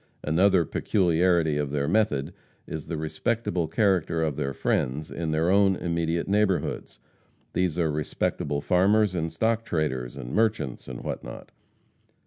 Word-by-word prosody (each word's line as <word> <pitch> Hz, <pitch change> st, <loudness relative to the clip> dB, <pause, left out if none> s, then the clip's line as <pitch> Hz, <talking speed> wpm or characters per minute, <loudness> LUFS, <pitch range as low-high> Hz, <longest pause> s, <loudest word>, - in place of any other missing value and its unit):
Another 90 Hz, +3 st, +3 dB
peculiarity 85 Hz, -3 st, +2 dB
of 75 Hz, -1 st, -1 dB
their 70 Hz, 0 st, -1 dB
method 80 Hz, -7 st, +1 dB, 0.3 s
is 80 Hz, -1 st, -6 dB
the 85 Hz, -, -3 dB
respectable 85 Hz, +3 st, -1 dB
character 90 Hz, -6 st, +1 dB
of 75 Hz, -3 st, -1 dB
their 70 Hz, -2 st, -2 dB
friends 70 Hz, +3 st, -1 dB
in 85 Hz, -1 st, -3 dB
their 80 Hz, +3 st, +1 dB
own 100 Hz, -1 st, +4 dB
immediate 85 Hz, -1 st, -1 dB
neighborhoods. 100 Hz, -2 st, 0 dB, 0.6 s
These 90 Hz, -3 st, 0 dB
are 80 Hz, -3 st, +1 dB
respectable 75 Hz, -1 st, -2 dB
farmers 100 Hz, +4 st, +3 dB
and 80 Hz, -2 st, -2 dB
stock 110 Hz, +7 st, 0 dB
traders, 70 Hz, -, -2 dB
and 65 Hz, -1 st, -7 dB
merchants 110 Hz, -, 0 dB
and 65 Hz, -1 st, -7 dB
what -, -, -4 dB
not. -, -, -10 dB
85 Hz, 140 wpm, -26 LUFS, 75-95 Hz, 0.6 s, own